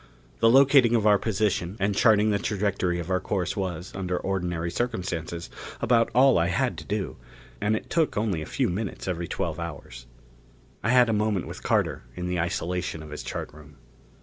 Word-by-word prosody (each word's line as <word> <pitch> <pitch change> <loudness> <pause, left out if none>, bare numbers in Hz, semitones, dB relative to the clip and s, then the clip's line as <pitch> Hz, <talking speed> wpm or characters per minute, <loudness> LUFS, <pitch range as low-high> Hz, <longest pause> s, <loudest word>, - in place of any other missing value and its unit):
The 115 - +5
locating 135 -2 +6
of 110 -2 +1
our 105 -2 +5
position 100 -3 -1
and 100 +1 +1
charting 110 -1 +4
the 100 - +1
trajectory 100 -4 -1
of 85 +1 -5
our 90 - +2
course 95 0 -2
was, 90 -2 -4
under 90 -1 -2
ordinary 90 -3 -2
circumstances, 90 -7 -3 0.3
about 115 -1 +3
all 130 -4 +6
I 85 - +2
had 85 - 0
to - - -9
do. - - -3 0.4
And 105 +1 +2
it - - -5
took 165 -8 +1
only 105 -6 0
a 75 - -6
few - - 0
minutes 95 +3 -4
every 85 -2 -2
twelve 85 -5 -3
hours. 70 -7 -8 0.8
I 115 - 0
had 125 0 +6
a 115 - +1
moment 105 -3 0
with - - -8
Carter - - 0
in 90 - -4
the 90 0 -1
isolation 85 -1 -2
of 75 - -11
his 75 - -6
chart - - -5
room. 75 -1 -15
95 Hz, 190 wpm, -26 LUFS, 85-110 Hz, 0.8 s, locating